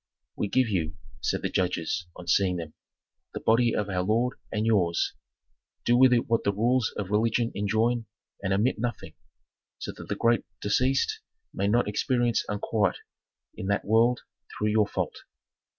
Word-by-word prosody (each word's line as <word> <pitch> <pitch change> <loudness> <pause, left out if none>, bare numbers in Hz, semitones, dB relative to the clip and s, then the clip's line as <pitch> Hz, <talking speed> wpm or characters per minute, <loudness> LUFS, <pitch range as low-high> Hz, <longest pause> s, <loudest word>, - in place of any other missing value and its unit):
"We 105 - -1
give 130 +4 +2
you," 85 -5 -2 0.2
said - - -1
the - - 0
judges, 90 -1 -1
on 90 - -10
seeing 90 +1 +3
them, 80 -3 -6 0.6
"the - - -2
body 115 +1 +3
of 105 - -1
our 95 -2 -1
lord 115 +6 0
and 105 +1 -1
yours. 90 -7 +2 0.7
Do 120 - +4
with 130 +1 +6
it 120 -1 +2
what 115 -1 +1
the 100 - +2
rules 120 +4 +1
of 100 -2 -4
religion 115 +2 +2
enjoin, 110 +3 0 0.3
and 95 -1 -2
omit 105 +5 +1
nothing, 120 +1 -4 0.6
so - - -5
that - - -11
the - - -2
great 115 0 +2 0.2
deceased 130 +6 +1 0.3
may 100 - 0
not 120 +3 +2
experience 120 +3 +1
unquiet 105 0 0 0.6
in 95 - -6
that 100 0 0
world 115 +3 +3 0.4
through 105 - +1
your 105 -1 +3
fault." - - -3
110 Hz, 165 wpm, -27 LUFS, 100-120 Hz, 0.7 s, with